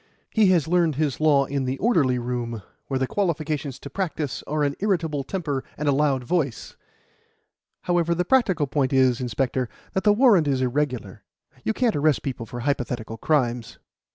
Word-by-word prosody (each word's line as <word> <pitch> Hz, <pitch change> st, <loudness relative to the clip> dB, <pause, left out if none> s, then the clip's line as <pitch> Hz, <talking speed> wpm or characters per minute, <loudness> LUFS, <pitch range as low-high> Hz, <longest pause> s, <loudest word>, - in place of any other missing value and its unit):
He 220 Hz, -3 st, +4 dB
has 175 Hz, -6 st, +3 dB
learned 170 Hz, -3 st, +2 dB
his 145 Hz, -3 st, -1 dB
law 145 Hz, -3 st, +4 dB
in 140 Hz, -1 st, -2 dB
the 130 Hz, +1 st, -2 dB
orderly 155 Hz, -, +2 dB
room, 120 Hz, -3 st, -4 dB, 0.2 s
where 135 Hz, -, -1 dB
the 130 Hz, -, +1 dB
qualifications 155 Hz, -6 st, -2 dB
to 140 Hz, -, -9 dB
practise 155 Hz, -6 st, -3 dB
are 150 Hz, 0 st, 0 dB
an 140 Hz, -1 st, +1 dB
irritable 165 Hz, -8 st, 0 dB
temper 145 Hz, -5 st, -3 dB
and 150 Hz, -, -3 dB
a -, -, +5 dB
loud 140 Hz, -2 st, +1 dB
voice. 140 Hz, -4 st, -2 dB, 1.1 s
However, 170 Hz, -1 st, +1 dB
the 180 Hz, +1 st, 0 dB
practical 190 Hz, -, +2 dB
point 135 Hz, -1 st, 0 dB
is, 130 Hz, -2 st, +3 dB
inspector, 125 Hz, +1 st, -1 dB, 0.2 s
that 190 Hz, -, -1 dB
the 210 Hz, -, +5 dB
warrant 210 Hz, -, +5 dB
is 135 Hz, -2 st, +1 dB
irregular. 125 Hz, -6 st, -2 dB, 0.4 s
You 220 Hz, -, 0 dB
can't 235 Hz, -1 st, +1 dB
arrest 150 Hz, -1 st, +2 dB
people 125 Hz, -4 st, -4 dB
for 120 Hz, -1 st, -6 dB
hypothetical 120 Hz, -4 st, -2 dB
crimes." 120 Hz, -6 st, 0 dB
145 Hz, 170 wpm, -24 LUFS, 130-170 Hz, 1.1 s, a